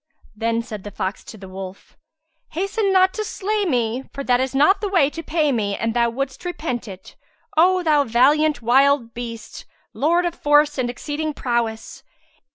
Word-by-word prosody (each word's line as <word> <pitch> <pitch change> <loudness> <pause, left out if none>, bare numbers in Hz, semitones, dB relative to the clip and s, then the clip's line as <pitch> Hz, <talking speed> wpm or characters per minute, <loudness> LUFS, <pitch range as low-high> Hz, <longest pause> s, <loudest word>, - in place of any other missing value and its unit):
'" - - -34
Then 230 +1 -1
said 215 -5 -8
the 205 - -6
fox 195 0 -4
to 220 - -10
the 190 -2 -11
wolf, 190 0 -9 0.6
"Hasten 395 +4 0
not 375 0 +4
to 430 - -3
slay 420 0 -2
me, 245 -4 -1
for 275 - -6
that 245 -2 +2
is 265 +1 -2
not 380 +9 +4
the 410 - -1
way 325 -7 +3
to 330 - -6
pay 310 -2 0
me 205 -5 -1
and 225 0 -1
thou 235 0 +2
wouldst 265 +2 -4
repent 310 -10 -4
it, 190 -2 -11 0.4
O 365 +3 +4
thou 300 -3 +3
valiant 275 +3 +3
wild 260 0 +3
beast, 230 -2 -8 0.3
lord 340 +4 +2
of 345 - -1
force 295 -2 +3
and 245 -1 0
exceeding 295 +4 -4
prowess! 235 -3 -2
270 Hz, 180 wpm, -21 LUFS, 230-320 Hz, 0.6 s, not